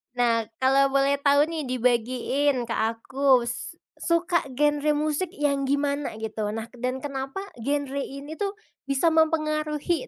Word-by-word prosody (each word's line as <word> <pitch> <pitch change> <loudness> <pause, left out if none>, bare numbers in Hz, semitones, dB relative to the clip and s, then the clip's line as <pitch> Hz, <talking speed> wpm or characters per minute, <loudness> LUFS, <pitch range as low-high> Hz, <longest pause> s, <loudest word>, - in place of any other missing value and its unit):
Nah, 230 -2 +2 0.2
kalau 275 +1 +5
boleh 275 +1 +3
tahu 285 0 +4
nih 315 -3 -3
dibagiin 250 +2 +1
ke 230 - -7
akus, 240 +2 +1 0.2
suka 340 -1 +1
genre 295 +1 +2
musik 305 +4 0
yang 280 -2 0
gimana 285 -1 0
gitu, 220 -1 -4
nah 225 +1 -6
dan 255 +2 -4
kenapa 275 +6 -4 0.2
genre 280 +2 -1
ini 275 +2 -6
tuh 405 0 -2 0.3
bisa 275 +4 +2
mempengaruhi 310 - +1
280 Hz, 130 wpm, -25 LUFS, 250-300 Hz, 0.3 s, kalau